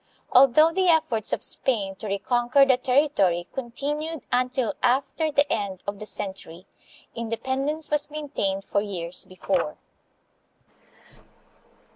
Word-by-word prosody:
Although 275 Hz, +5 st, +6 dB
the 375 Hz, +2 st, +1 dB
efforts 250 Hz, -, +2 dB
of -, -, -1 dB
Spain 205 Hz, -7 st, 0 dB
to 215 Hz, -, -7 dB
reconquer 240 Hz, +7 st, +2 dB
the 265 Hz, -2 st, +4 dB
territory 250 Hz, -, +1 dB
continued 290 Hz, +5 st, -4 dB
until 250 Hz, -2 st, 0 dB
after 275 Hz, +5 st, +1 dB
the 285 Hz, 0 st, +3 dB
end 200 Hz, -3 st, -4 dB
of 200 Hz, 0 st, -5 dB
the 215 Hz, -, -4 dB
cen 200 Hz, -2 st, -2 dB
tury, 175 Hz, -1 st, -12 dB, 0.5 s
independence 265 Hz, +7 st, -2 dB
was 295 Hz, 0 st, +2 dB
maintained 275 Hz, -11 st, -3 dB
for 200 Hz, -, 0 dB
years 180 Hz, -4 st, -4 dB
before. 185 Hz, -3 st, -2 dB
245 Hz, 120 wpm, -25 LUFS, 200-285 Hz, 0.5 s, Although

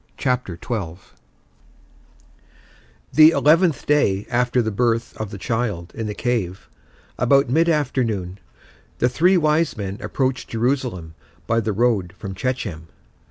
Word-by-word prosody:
CHAPTER 125 Hz, -, -1 dB
XII 90 Hz, -6 st, -4 dB, 2.2 s
The 155 Hz, 0 st, +8 dB
eleventh 165 Hz, -1 st, +3 dB
day 105 Hz, -10 st, +2 dB
after 125 Hz, +1 st, +1 dB
the 110 Hz, -, -2 dB
birth 115 Hz, +2 st, 0 dB
of 110 Hz, -2 st, -4 dB
the 100 Hz, -, -8 dB
child 100 Hz, -4 st, -3 dB
in 115 Hz, -2 st, -4 dB
the 105 Hz, -, -4 dB
cave, 105 Hz, -8 st, -2 dB, 0.5 s
about 135 Hz, +1 st, +3 dB
mid 165 Hz, +5 st, +3 dB
afternoon, 115 Hz, -, -1 dB, 0.6 s
the 125 Hz, -, +2 dB
three 175 Hz, +9 st, +3 dB
wise 155 Hz, -2 st, +1 dB
men 100 Hz, -1 st, -5 dB
approached 130 Hz, -1 st, -2 dB
Jerusalem 115 Hz, -, -2 dB, 0.3 s
by 115 Hz, 0 st, +1 dB
the 110 Hz, -1 st, -1 dB
road 105 Hz, -4 st, 0 dB
from 95 Hz, -2 st, -6 dB
Shechem. 95 Hz, -8 st, -4 dB
120 Hz, 125 wpm, -21 LUFS, 100-130 Hz, 2.2 s, The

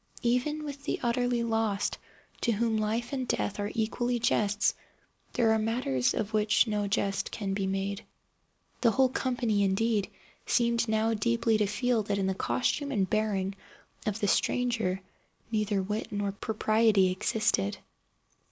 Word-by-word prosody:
Even 250 Hz, +6 st, +1 dB
with 285 Hz, -1 st, -7 dB
the -, -, -1 dB
utterly 240 Hz, 0 st, +1 dB
lost, 225 Hz, -3 st, 0 dB, 0.4 s
to 235 Hz, -, +2 dB
whom 225 Hz, +1 st, +1 dB
life 220 Hz, +4 st, -1 dB
and 260 Hz, -2 st, -2 dB
death 205 Hz, -, -1 dB
are 205 Hz, 0 st, -1 dB
equally 240 Hz, +2 st, 0 dB
jests, 210 Hz, -3 st, +2 dB, 0.6 s
there 230 Hz, -2 st, +3 dB
are 220 Hz, -, +3 dB
matters 175 Hz, -, 0 dB
of 215 Hz, +1 st, -2 dB
which 215 Hz, +1 st, +3 dB
no 210 Hz, -2 st, -1 dB
jest 195 Hz, 0 st, 0 dB
can 200 Hz, -3 st, -3 dB
be 195 Hz, -1 st, -1 dB
made. 195 Hz, +2 st, -2 dB, 0.8 s
The 235 Hz, -, +5 dB
whole 260 Hz, +3 st, +3 dB
company, 245 Hz, -5 st, 0 dB
indeed, 200 Hz, +2 st, +1 dB, 0.4 s
seemed 235 Hz, -1 st, +2 dB
now 220 Hz, +1 st, +1 dB
deeply 230 Hz, +1 st, +1 dB
to 210 Hz, -, +2 dB
feel 235 Hz, +3 st, +1 dB
that 200 Hz, -1 st, -2 dB
in 195 Hz, -, 0 dB
the 190 Hz, -, +1 dB
costume 190 Hz, -, -1 dB
and 200 Hz, -7 st, +1 dB
bearing 200 Hz, -3 st, 0 dB, 0.5 s
of 210 Hz, 0 st, -1 dB
the 205 Hz, -, 0 dB
stranger 225 Hz, -4 st, +1 dB, 0.5 s
neither 210 Hz, -3 st, 0 dB
wit 210 Hz, +4 st, -3 dB
nor 205 Hz, -1 st, -1 dB
propriety 215 Hz, -1 st, +2 dB
existed. 185 Hz, -, 0 dB
220 Hz, 150 wpm, -29 LUFS, 200-235 Hz, 0.8 s, The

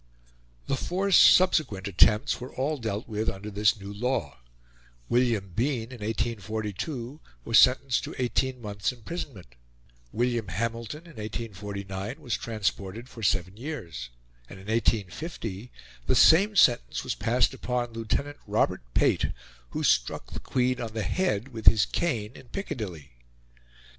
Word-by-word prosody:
The -, -, 0 dB
four 190 Hz, +8 st, -1 dB
subsequent 155 Hz, -, +5 dB
attempts 105 Hz, +8 st, +3 dB
were 125 Hz, -, -7 dB
all 145 Hz, +3 st, -1 dB
dealt 110 Hz, -2 st, -3 dB
with 110 Hz, 0 st, -1 dB
under 100 Hz, +2 st, -7 dB
this 105 Hz, +1 st, +2 dB
new 100 Hz, 0 st, -7 dB
law; 100 Hz, -, -2 dB, 0.7 s
William 115 Hz, -6 st, +1 dB
Bean, 120 Hz, -1 st, -1 dB
in 125 Hz, -, -9 dB
1842, 110 Hz, -, -3 dB, 0.3 s
was 115 Hz, -, +6 dB
sentenced 130 Hz, 0 st, +4 dB
to -, -, -7 dB
eighteen 125 Hz, 0 st, -1 dB
months' 105 Hz, +1 st, -2 dB
imprisonment; 120 Hz, -, -7 dB, 0.6 s
William 120 Hz, -2 st, 0 dB
Hamilton, 115 Hz, +5 st, -3 dB
in 165 Hz, -7 st, -15 dB
1849, 105 Hz, -, -5 dB
was 120 Hz, -7 st, -2 dB
transported 110 Hz, +1 st, -3 dB
for 115 Hz, -, -11 dB
seven 95 Hz, -2 st, +1 dB
years; 105 Hz, -, -6 dB, 0.4 s
and, 100 Hz, -, -10 dB
in 95 Hz, -, -13 dB
1850, 110 Hz, -, -2 dB, 0.4 s
the -, -, +3 dB
same 200 Hz, +6 st, +6 dB
sentence 120 Hz, -, +4 dB
was -, -, -2 dB
passed 120 Hz, +2 st, +2 dB
upon 120 Hz, -1 st, -2 dB
Lieutenant 140 Hz, +6 st, -2 dB
Robert -, -, +1 dB
Pate, -, -, +3 dB, 0.4 s
who -, -, -3 dB
struck -, -, +1 dB
the -, -, -5 dB
Queen 125 Hz, 0 st, 0 dB
on 115 Hz, -2 st, -5 dB
the 110 Hz, -1 st, -2 dB
head 125 Hz, -, 0 dB
with 115 Hz, -4 st, -8 dB
his 110 Hz, -2 st, +7 dB
cane 115 Hz, -11 st, -1 dB
in 130 Hz, -, -14 dB
Piccadilly. 105 Hz, -, -5 dB
115 Hz, 140 wpm, -27 LUFS, 100-130 Hz, 0.7 s, his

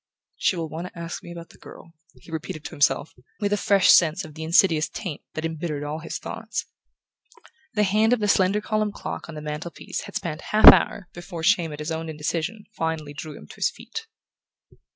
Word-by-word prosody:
"She -, -, +1 dB
will 165 Hz, -2 st, -3 dB
want 165 Hz, +3 st, -6 dB
to 180 Hz, -, -14 dB
ask 170 Hz, 0 st, -5 dB
me 175 Hz, -, -10 dB
about 170 Hz, -1 st, -9 dB
the -, -, -19 dB
girl," 165 Hz, -, -13 dB, 0.2 s
he -, -, -16 dB
repeated 160 Hz, -1 st, -5 dB
to -, -, -5 dB
himself, 145 Hz, +2 st, +1 dB, 0.3 s
with 205 Hz, -1 st, 0 dB
a -, -, +4 dB
fresh 200 Hz, -2 st, +4 dB
sense 170 Hz, +3 st, +4 dB
of 155 Hz, -, -11 dB
the 160 Hz, -, -9 dB
insidious 160 Hz, -1 st, +3 dB
taint 175 Hz, -8 st, -6 dB
that 155 Hz, -, -3 dB
embittered 160 Hz, -2 st, -3 dB
all 150 Hz, +2 st, -4 dB
his 160 Hz, -, -5 dB
thoughts; -, -, -5 dB, 1.1 s
the 210 Hz, -, +3 dB
hand 215 Hz, +3 st, +3 dB
of 245 Hz, -, +3 dB
the 210 Hz, -, 0 dB
slender 195 Hz, +1 st, +3 dB
columned 215 Hz, -1 st, -1 dB
clock -, -, -6 dB
on 165 Hz, -, -8 dB
the 150 Hz, -, -7 dB
mantel 150 Hz, +3 st, -4 dB
piece -, -, -6 dB
had -, -, -11 dB
spanned 155 Hz, -2 st, -3 dB
a -, -, -13 dB
half 215 Hz, +1 st, +4 dB
hour 190 Hz, -, 0 dB
before 175 Hz, -1 st, -7 dB
shame 175 Hz, -3 st, +3 dB
at 150 Hz, -, -6 dB
his 150 Hz, +2 st, -4 dB
own 160 Hz, 0 st, -3 dB
indecision 165 Hz, +7 st, -3 dB
finally 160 Hz, -3 st, -3 dB
drew 145 Hz, +1 st, -8 dB
him -, -, -12 dB
to -, -, -12 dB
his -, -, +2 dB
feet. 450 Hz, 0 st, -8 dB
165 Hz, 215 wpm, -24 LUFS, 155-195 Hz, 1.1 s, a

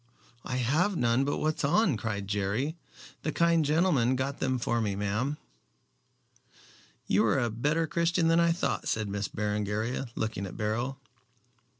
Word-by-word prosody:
"I 125 Hz, -, -4 dB
have 155 Hz, -, +1 dB
none 120 Hz, +3 st, +2 dB
but 145 Hz, -, -1 dB
what's 155 Hz, 0 st, -1 dB
on," 170 Hz, -, +3 dB
cried 105 Hz, -2 st, -3 dB
Jerry. 105 Hz, +10 st, -1 dB, 0.5 s
"The 155 Hz, -, -2 dB
kind 170 Hz, 0 st, +3 dB
gentleman 150 Hz, -5 st, +2 dB
got 135 Hz, +2 st, -2 dB
them 130 Hz, -1 st, 0 dB
for 120 Hz, -1 st, 0 dB
me, 105 Hz, -3 st, -1 dB
ma'am." 105 Hz, +9 st, -1 dB, 1.7 s
"You 100 Hz, +3 st, +3 dB
are 110 Hz, -, +2 dB
a 120 Hz, -3 st, 0 dB
better 150 Hz, +9 st, 0 dB
Christian 170 Hz, +1 st, +1 dB
than 165 Hz, +1 st, +4 dB
I 170 Hz, 0 st, +4 dB
thought," 170 Hz, -, -1 dB
said 110 Hz, -1 st, 0 dB
Miss 100 Hz, 0 st, -2 dB
Berengaria, 105 Hz, +4 st, -2 dB
looking 110 Hz, -3 st, -2 dB
at -, -, -9 dB
Beryl. 120 Hz, +5 st, -2 dB
125 Hz, 155 wpm, -29 LUFS, 105-155 Hz, 1.7 s, than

